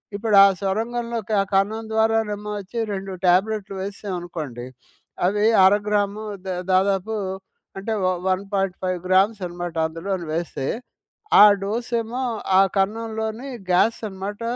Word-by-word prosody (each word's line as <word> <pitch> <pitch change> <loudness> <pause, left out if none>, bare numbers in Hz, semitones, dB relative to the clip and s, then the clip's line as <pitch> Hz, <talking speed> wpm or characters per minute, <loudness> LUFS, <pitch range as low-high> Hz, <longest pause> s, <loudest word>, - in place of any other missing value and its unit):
ఇప్పుడా 205 -1 +5 0.2
సొరంగంలోకి 225 +2 -2
ఆ - - +1
కన్నం 210 +3 +1
ద్వారానేమో 220 -2 0
అచ్చి 200 +4 -6
2 195 0 -5
ట్యాబ్లెటులు 195 +3 +2
వేశాం 200 0 -5
అనుకోండి. 150 -9 -6 0.6
అవి 205 +3 +2 0.2
అరగ్రాము 205 +1 +1 0.2
ద 190 - -4 0.2
దాదాపు 195 +3 +1 0.6
అంటే 210 +3 -3
వ - - +3 0.2
1.5 190 -1 -1
గ్రామ్స్ 195 +3 +3
అనమాట. 175 -1 -6
అందులోను 170 +2 -4
వేస్తే, 160 -5 -3 0.8
ఆ - - +12 0.2
డోసెమో 235 +3 -2 0.4
ఆ - - +8 0.2
కన్నంలోని 220 +4 -2 0.2
గ్యాస్ 215 +6 +3
అనమాట. 195 +2 -6
200 Hz, 110 wpm, -23 LUFS, 190-220 Hz, 0.8 s, ఆ